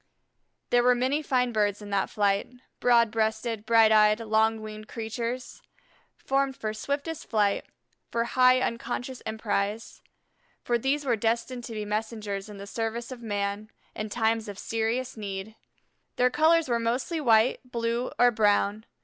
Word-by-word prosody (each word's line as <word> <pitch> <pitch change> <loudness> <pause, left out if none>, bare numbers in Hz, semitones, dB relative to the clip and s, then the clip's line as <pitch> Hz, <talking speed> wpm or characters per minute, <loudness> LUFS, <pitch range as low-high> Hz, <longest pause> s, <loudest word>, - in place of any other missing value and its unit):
There 245 - +5
were 250 0 +4
many 260 +5 0
fine 250 -4 +1
birds 205 -2 +1
in 205 -1 -9
that 200 -1 0
flight, 200 0 +1 0.3
broad 235 -2 +4
breasted, 220 0 -1
bright 225 -1 +6
eyed, 215 0 +5
long 220 0 +2
winged 215 0 -8
creatures, 235 +2 -5 0.6
formed 270 0 0
for 215 -1 -3
swiftest 285 +7 -4
flight, 205 -3 +1 0.4
for 230 - 0
high 255 +1 +4
unconscious 245 +2 -3
emprise, 220 0 -2 0.6
for 240 -1 +1
these 280 +4 0
were 245 -3 +2
destined 235 +3 -1
to 230 - -7
be 210 -1 -3
messengers 210 -1 -3
in 205 - -9
the 200 - -8
service 230 +3 -4
of 250 -2 -8
man 205 -1 -3 0.3
in 215 0 -4
times 225 0 0
of 200 - -7
serious 230 +4 -2
need. 200 0 -5 0.6
Their 250 0 +3
colors 320 +2 +4
were 235 -2 +1
mostly 250 +8 -1
white, 230 -2 +4
blue, 235 0 -2
or 245 0 +5
brown. 210 -1 +1
225 Hz, 150 wpm, -27 LUFS, 215-245 Hz, 0.6 s, bright